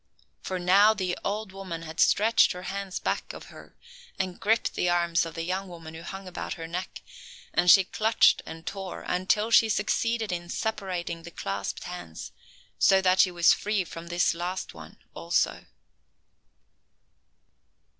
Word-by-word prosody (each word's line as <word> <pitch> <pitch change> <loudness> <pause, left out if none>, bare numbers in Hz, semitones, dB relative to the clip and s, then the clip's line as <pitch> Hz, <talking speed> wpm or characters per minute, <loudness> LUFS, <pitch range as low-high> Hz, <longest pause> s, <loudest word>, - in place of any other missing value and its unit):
For 185 - -3
now 195 +5 +5
the 185 -3 -2
old 210 0 -3
woman 185 -4 -7
had 160 0 -9
stretched 225 +3 +4
her 180 0 -8
hands 195 0 -4
back - - -3
of - - -9
her - - -14 0.4
and 185 -2 -3
gripped 225 +4 +1
the 180 - 0
arms 170 -1 +1
of 165 - -10
the 165 - -3
young 190 +3 -3
woman 165 -3 -10
who 160 - -9
hung 195 +2 -8
about 180 - -5
her 165 - -7
neck, 180 +3 -6 0.5
and 175 0 +3
she 195 +2 +9
clutched 220 +4 +3
and 160 0 -9
tore 190 -2 -6
until 210 +5 +1
she 225 -1 +6
succeeded 220 +1 0
in 175 -1 -4
separating 185 -6 -3
the 170 - -10
clasped 100 -10 -4
hands, 175 - -8 0.5
so 195 - +5
that 185 0 +2
she 185 - +6
was 175 -1 +4
free 210 -2 -1
from 165 0 -9
this 175 +1 +1
last 175 +2 -4
one - - -12 0.2
also. - - -1
185 Hz, 160 wpm, -27 LUFS, 170-200 Hz, 0.5 s, she